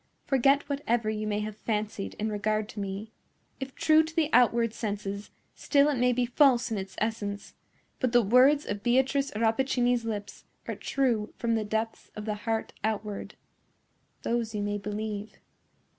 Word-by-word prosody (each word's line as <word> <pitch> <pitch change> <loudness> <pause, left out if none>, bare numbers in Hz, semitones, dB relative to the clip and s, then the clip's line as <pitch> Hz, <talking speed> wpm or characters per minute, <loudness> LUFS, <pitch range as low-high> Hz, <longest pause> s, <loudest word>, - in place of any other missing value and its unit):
"Forget 275 +2 +3
whatever 240 -6 0
you 215 0 -3
may 210 0 0
have 210 0 -4
fancied 210 -2 -3
in 215 +1 -2
regard 215 0 0
to 210 - -7
me. 200 +2 -5 0.5
If 265 -1 -6
true 310 0 +5
to 320 0 -6
the 320 -2 +1
outward 235 -2 +4
senses, 205 -2 -4 0.2
still 285 0 +3
it 285 - 0
may 250 0 +4
be 245 0 +1
false 250 -1 +3
in 215 - -1
its 190 0 -7
essence; 210 -2 -3 0.5
but 255 -3 +1
the 240 -1 +5
words 260 +7 +5
of 205 0 -4
Beatrice 265 +4 +2
Rappaccini's 240 +2 +2
lips 210 -3 -5 0.2
are - - -2
true 240 -6 -1
from 235 -1 0
the 220 -1 +1
depths 220 +2 -3
of 210 - -6
the 215 - -1
heart 220 +1 -3
outward. 210 -1 -3 0.9
Those 230 -2 -1
you 205 - -1
may 205 0 -1
believe." 210 0 -4
225 Hz, 165 wpm, -28 LUFS, 210-250 Hz, 0.9 s, true